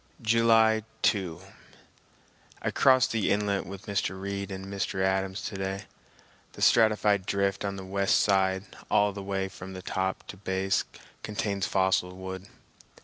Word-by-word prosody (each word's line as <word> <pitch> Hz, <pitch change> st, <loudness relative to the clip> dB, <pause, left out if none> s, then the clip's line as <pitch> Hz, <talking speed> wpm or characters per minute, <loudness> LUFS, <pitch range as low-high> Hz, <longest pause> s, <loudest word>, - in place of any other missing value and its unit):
July 110 Hz, -1 st, +4 dB, 0.2 s
2. 95 Hz, -6 st, +1 dB, 1.2 s
I -, -, 0 dB
crossed 130 Hz, -2 st, +4 dB
the 110 Hz, -3 st, 0 dB
inlet 100 Hz, -1 st, 0 dB
with 95 Hz, 0 st, -9 dB
Mr. 100 Hz, -2 st, -2 dB
Reid 100 Hz, 0 st, -4 dB
and 95 Hz, -1 st, -6 dB
Mr. 100 Hz, -1 st, -3 dB
Adams 95 Hz, 0 st, 0 dB
to 105 Hz, -, -5 dB
day. 95 Hz, +1 st, -3 dB, 0.7 s
The -, -, -4 dB
stratified 105 Hz, -4 st, +4 dB
drift 100 Hz, 0 st, 0 dB
on 100 Hz, -1 st, -2 dB
the 95 Hz, -1 st, -7 dB
west 100 Hz, +1 st, +2 dB
side 95 Hz, -1 st, +2 dB, 0.3 s
all 105 Hz, 0 st, +3 dB
the 100 Hz, -, -6 dB
way 95 Hz, 0 st, -2 dB
from 95 Hz, 0 st, -9 dB
top 95 Hz, 0 st, -2 dB
to 100 Hz, -, -8 dB
base 95 Hz, 0 st, 0 dB, 0.4 s
contains 100 Hz, -2 st, -2 dB
fossil 95 Hz, -1 st, +1 dB
wood. 95 Hz, +1 st, -7 dB
100 Hz, 145 wpm, -28 LUFS, 95-105 Hz, 1.2 s, July